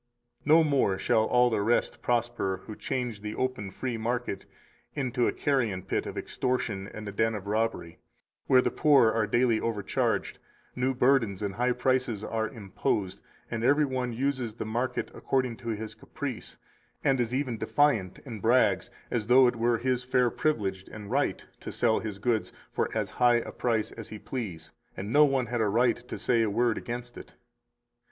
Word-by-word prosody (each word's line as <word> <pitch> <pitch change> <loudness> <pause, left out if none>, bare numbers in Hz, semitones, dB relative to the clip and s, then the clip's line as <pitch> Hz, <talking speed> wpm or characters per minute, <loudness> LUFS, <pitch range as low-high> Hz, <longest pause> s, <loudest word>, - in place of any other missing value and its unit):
240 - - -2
No - - +1
more 95 -7 +2
shall 110 +2 +2
all 125 +1 +3
the 110 -2 +1
rest 115 +4 +1
prosper 120 -6 -1
who 110 - -7
change 125 -5 -3
the 105 0 -5
open 130 -6 -2
free 120 +5 -4
market 120 -2 -3 0.5
into 125 -4 0
a - - +2
carrion 115 -10 0
pit - - -2
of - - -6
extortion 125 -7 -2
and 105 0 -8
a - - -4
den 110 +2 +1
of 100 -2 -6
robbery, 105 -5 -2 0.5
where 130 -1 +5
the - - +1
poor 140 -7 +5
are 110 -2 +1
daily 120 0 +2
overcharged, 105 -4 -1 0.4
new 130 +1 0
burdens 125 -6 +2
and 100 -1 -2
high 125 +5 +1
prices 125 -3 0
are 110 -1 -2
imposed, 95 -2 -2 0.3
and 115 -1 -2
every 145 +4 +4
one 130 -2 -2
uses 125 -2 -2
the 115 - -5
market 120 +4 -2
according 130 -3 -1
to 115 0 -7
his 110 0 -4
caprice, 135 -6 -7 0.5
and 135 -2 +3
is 120 -1 -1
even 130 -5 -2
defiant 125 -11 +2
and 115 -6 -7
brags 110 -5 +3 0.2
as 110 -3 -1
though 130 +2 +7
it 120 - +2
were 115 0 +2
his 125 +1 0
fair 125 -1 +2
privilege 100 -12 -1
and 105 0 -8
right 140 +3 0
to - - -7
sell 115 -2 +2
his 105 -3 -5
goods 110 +1 0 0.2
for - - 0
as - - -1
high 120 -1 +6
a 120 - -1
price 115 -3 -1
as - - -9
he 110 - -7
please, 95 -10 -6 0.3
and 100 +4 -4
no 150 +1 +7
one 135 -3 +1
had 120 0 -2
a 110 - +2
right 120 +3 +1
to - - -5
say 120 -2 +2
a 110 - +2
word 115 +2 +2
against 120 0 -6
it. - - -13
120 Hz, 185 wpm, -28 LUFS, 105-125 Hz, 0.5 s, though